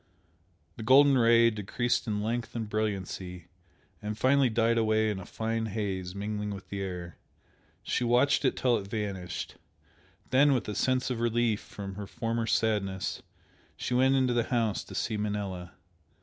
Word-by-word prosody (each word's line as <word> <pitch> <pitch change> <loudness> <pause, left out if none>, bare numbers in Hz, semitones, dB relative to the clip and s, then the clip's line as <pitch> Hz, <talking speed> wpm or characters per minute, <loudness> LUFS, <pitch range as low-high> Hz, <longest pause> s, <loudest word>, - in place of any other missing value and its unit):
The 110 - -6
golden 135 +4 +6
Ray 115 -1 +5
decreased 110 +4 -1
in 105 -1 -1
length 115 +1 -3
and 115 -2 -3
brilliancy, 95 -4 -3 0.5
and 105 0 -4
finally 130 +1 +4
died 115 +1 +2
away 110 -1 +2
in 100 - -4
a 95 - -9
fine 115 0 -2
haze 95 -4 -3
mingling 105 +1 -3
with 100 -2 -7
the 100 -1 -4
air. 90 -3 -6 0.6
She - - -1
watched 120 +4 +3
it - - +1
till 125 -2 +3
it 100 - -8
vanished, 100 -5 -4 0.7
then 140 +1 +5
with 125 - -2
a 105 - -3
sense 130 +3 +1
of 120 - -2
relief 120 -2 +1
from 100 -1 -8
her 100 -1 -6
former 115 +1 -2
sadness, 105 -4 0 0.6
she - - -3
went 130 +2 +4
into 130 -2 +2
the 120 -1 +1
house 115 -5 0
to - - -10
see 110 - -1
Manella. 100 -4 -3
110 Hz, 165 wpm, -29 LUFS, 100-120 Hz, 0.7 s, golden